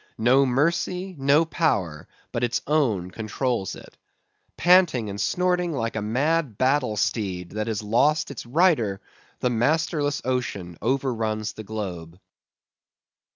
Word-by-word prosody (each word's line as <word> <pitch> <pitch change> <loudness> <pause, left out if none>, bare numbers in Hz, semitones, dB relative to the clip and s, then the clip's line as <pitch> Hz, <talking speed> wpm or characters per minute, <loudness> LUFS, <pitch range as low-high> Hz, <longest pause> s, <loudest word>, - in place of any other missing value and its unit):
No 130 +4 +4
mercy, 170 +7 0
no 140 +4 +4
power 95 - -1 0.2
but 120 - -2
its 120 -1 0
own 115 - +1
controls 110 -1 -2
it. - - -14 0.6
Panting 170 - +4
and 100 0 -4
snorting 180 - +1
like 115 -5 -2
a 110 - -1
mad 135 +3 0
battle 130 -4 +1
steed 95 -5 -2
that 110 +1 -3
has 110 -2 -2
lost 140 +9 +2
its 140 - -7
rider, 120 - +2 0.4
the 125 - +1
masterless 145 +4 +1
ocean 105 -9 -2
overruns 115 -5 -1
the 110 - -8
globe. 90 -5 -6
125 Hz, 125 wpm, -24 LUFS, 105-150 Hz, 0.6 s, No